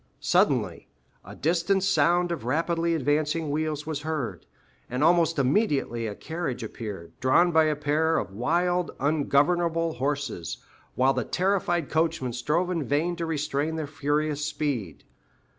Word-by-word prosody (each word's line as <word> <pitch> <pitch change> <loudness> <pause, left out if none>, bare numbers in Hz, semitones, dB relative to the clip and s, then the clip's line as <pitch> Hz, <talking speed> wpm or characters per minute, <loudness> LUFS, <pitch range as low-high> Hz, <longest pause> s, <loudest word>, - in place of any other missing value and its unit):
Suddenly - - +1 0.4
a - - -11
distant 175 +4 +1
sound 175 -2 +3
of 165 -7 -3
rapidly 165 +5 0
advancing 150 +1 0
wheels 155 0 -2
was 155 -2 -3
heard, 150 - -4 0.4
and 125 +3 -1
almost 165 0 +4
immediately 135 - +1
a 105 - -5
carriage 160 -4 -4
appeared, 100 -8 -7
drawn 170 +8 +4
by 160 -1 +5
a 155 -1 +1
pair 150 +2 +1
of 95 - -3
wild, 175 - +1
ungovernable 160 +3 +2
horses, 135 - -3 0.4
while 130 +1 +3
the - - -1
terrified 180 -4 0
coachman 160 -6 0
strove 155 +9 0
in 165 -4 -1
vain 150 +6 0
to 165 -1 -3
restrain 150 0 -1
their 160 -1 -2
furious 150 +1 -1
speed. 140 - -3
155 Hz, 140 wpm, -26 LUFS, 140-170 Hz, 0.4 s, by